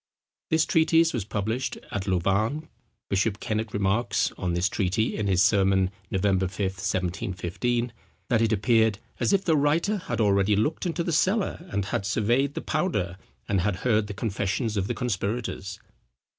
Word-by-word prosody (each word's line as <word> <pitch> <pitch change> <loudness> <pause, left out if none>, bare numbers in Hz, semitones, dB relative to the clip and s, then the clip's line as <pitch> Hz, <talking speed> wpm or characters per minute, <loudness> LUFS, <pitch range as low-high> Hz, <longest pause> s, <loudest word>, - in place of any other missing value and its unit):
This 160 0 +3
treatise 165 0 +3
was 110 -6 -2
published 110 +5 -2
at 100 -1 -3
Louvain. 100 - 0 0.4
Bishop 100 +1 0
Kennet 110 0 -2
remarks 100 +4 +1
on 90 -2 -2
this 85 +2 +2
treatise, 100 +3 0
in 105 - -2
his 95 -1 +4
Sermon, 95 -2 +3 0.2
November 95 -1 +1
5th, 95 +1 -3
1715, 95 +6 -2 0.3
that 115 -3 +2
it 115 -1 +2
appeared 110 0 +3 0.2
"as - - +2
if 195 -1 +2
the 160 - +3
writer 155 +8 +2
had 180 - -4
already 100 -1 +3
looked 150 - 0
into 170 0 -1
the 170 - -2
cellar 185 +1 +1
and 100 - -1
had 100 0 -2
surveyed 125 +8 +1
the - - -3
powder, 155 - -1 0.3
and 100 -3 +1
had 100 +1 0
heard 110 -3 +3
the 105 - -6
confessions 105 +2 -1
of 100 -1 0
the - - -2
conspirators." 105 -3 -3
105 Hz, 160 wpm, -26 LUFS, 95-125 Hz, 0.4 s, his